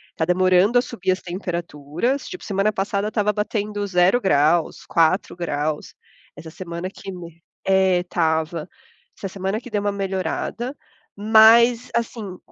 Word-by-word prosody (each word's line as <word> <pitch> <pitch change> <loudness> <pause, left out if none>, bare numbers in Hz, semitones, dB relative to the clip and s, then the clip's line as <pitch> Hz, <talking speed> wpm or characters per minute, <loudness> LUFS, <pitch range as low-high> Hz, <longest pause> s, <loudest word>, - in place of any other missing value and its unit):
Tá 160 - 0
demorando 185 +5 +3
a 245 - +5
subir 195 -7 -2
as 185 - -2
temperaturas, 175 - -3
tipo 365 - -8
semana 200 +1 0
passada 200 +1 -2
estava 210 -1 0
batendo 210 0 -2
0 180 +5 +3
graus, 155 -1 +2
4 165 +3 +1
graus. 155 -3 -3 0.4
Essa 160 - -10
semana 170 +1 -6
que 195 0 -9
me 170 -2 -11 0.3
é 190 -2 +4
estava. 160 -2 -1 0.5
Essa 195 - -5
semana 195 +2 -3
que 250 - -11
deu 210 -2 -1
uma 205 - 0
melhorada, 195 - -3 0.4
mas 225 +3 +5
assim 225 -5 -3
190 Hz, 140 wpm, -22 LUFS, 170-210 Hz, 0.5 s, a